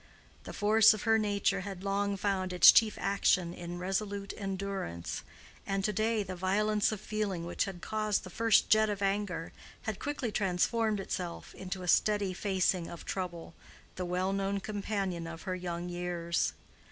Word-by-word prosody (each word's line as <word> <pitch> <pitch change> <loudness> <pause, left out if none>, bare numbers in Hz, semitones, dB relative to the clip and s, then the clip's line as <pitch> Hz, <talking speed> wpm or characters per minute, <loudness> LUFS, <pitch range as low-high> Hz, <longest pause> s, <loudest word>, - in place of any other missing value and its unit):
The - - -6
force 215 +1 +5
of 215 - -7
her 225 -1 +4
nature 200 -2 +1
had 190 -1 -7
long 200 0 0
found 190 -2 -1
its 180 -2 +9
chief 220 -2 +4
action 190 -3 +2
in 175 0 -6
resolute 200 +2 -3
endurance, 195 - -4 0.5
and 195 0 -1
to 210 - 0
day 220 +1 +1
the 185 -1 -6
violence 210 +4 +1
of 215 - -4
feeling 205 -5 -3
which 175 - -1
had 190 -3 -8
caused 215 -1 0
the 185 - -9
first 225 +3 +3
jet 215 0 +5
of 200 -1 -2
anger 195 -4 -1 0.3
had 220 -3 -3
quickly 285 -6 -3
transformed 210 +3 +1
itself 180 -2 -5
into 185 0 -6
a - - -6
steady 205 0 +3
facing 185 -2 0
of 170 - -9
trouble, 175 -3 -4 0.4
the 185 - -3
well 180 +2 -1
known 195 0 -1
companion 195 -4 -3
of 165 0 -8
her 185 - -2
young 175 -1 -4
years. 175 -1 -1
195 Hz, 165 wpm, -31 LUFS, 180-210 Hz, 0.5 s, its